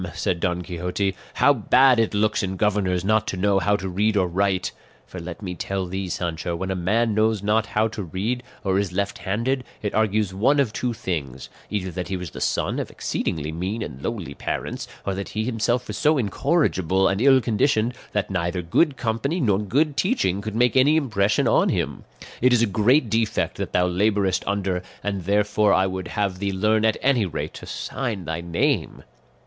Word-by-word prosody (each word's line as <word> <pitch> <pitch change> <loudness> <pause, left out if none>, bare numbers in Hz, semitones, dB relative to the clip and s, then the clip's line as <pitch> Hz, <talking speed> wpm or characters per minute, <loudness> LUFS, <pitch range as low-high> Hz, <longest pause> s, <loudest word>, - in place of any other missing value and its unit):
said 85 0 -1
Don 90 0 -1
Quixote, 90 +2 -2 0.2
"how 145 - +5
bad 125 +1 +4
it 115 -2 +1
looks 105 +1 +2
in 95 -1 -2
governors 95 -3 +1
not 110 +1 +2
to 95 - -3
know 100 +1 +2
how 105 +2 +2
to 95 -2 -3
read 105 +4 +1
or 95 - +3
write; 95 +1 0 0.3
for 90 - -9
let 85 +4 -8
me 90 -2 -4
tell 95 +1 -3
thee, 95 +1 -4
Sancho, 85 -1 -3
when 95 +3 -3
a - - -1
man 110 +6 +1
knows 110 -1 +1
not 110 +2 +2
how 110 0 +1
to 110 - -6
read, 100 +8 -2 0.2
or 95 -1 +1
is 100 -3 -1
left 100 +2 -2
handed, 115 +7 -1 0.2
it 105 - -2
argues 105 -2 +1
one 130 +10 +3
of 125 -6 +1
two 125 - -1
things; 80 - -4 0.2
either 95 -3 -2
that 90 +1 -4
he 95 - -2
was 90 -3 -7
the - - -8
son - - 0
of - - -3
exceedingly 80 -2 -3
mean 95 +7 -3
and 65 - -8
lowly 95 -10 -4
parents, - - -4 0.2
or 100 - -1
that 100 +1 -5
he 110 - -2
himself 120 +1 0
was - - -5
so 155 0 +3
incorrigible 95 - +1
and 95 +2 0
ill 135 0 +6
conditioned 115 0 +1 0.2
that 105 -1 -1
neither 90 -1 -1
good 135 - +2
company 125 +9 -1
nor 105 - +2
good 140 +8 +1
teaching 130 - +1
could 110 +1 -5
make 125 +2 +3
any 135 +4 +5
impression 110 -9 +1
on - - +3
him. - - -2 0.4
It 125 +1 +5
is 120 -1 +4
a - - +5
great 115 +7 +3
defect 115 0 0
that - - -4
thou 90 - +3
labourest 100 +1 +1
under, 95 -2 -1 0.2
and 100 -4 -3
therefore 105 +1 +2
I 95 - +3
would 95 -1 -4
have 100 -4 -2
thee 100 0 -1
learn 110 +3 +2
at 110 - +2
any 125 -7 +3
rate 85 - -4
to - - -10
sign 115 -9 -4
thy 80 +2 -3
name." 85 - -1
100 Hz, 200 wpm, -23 LUFS, 95-115 Hz, 0.4 s, ill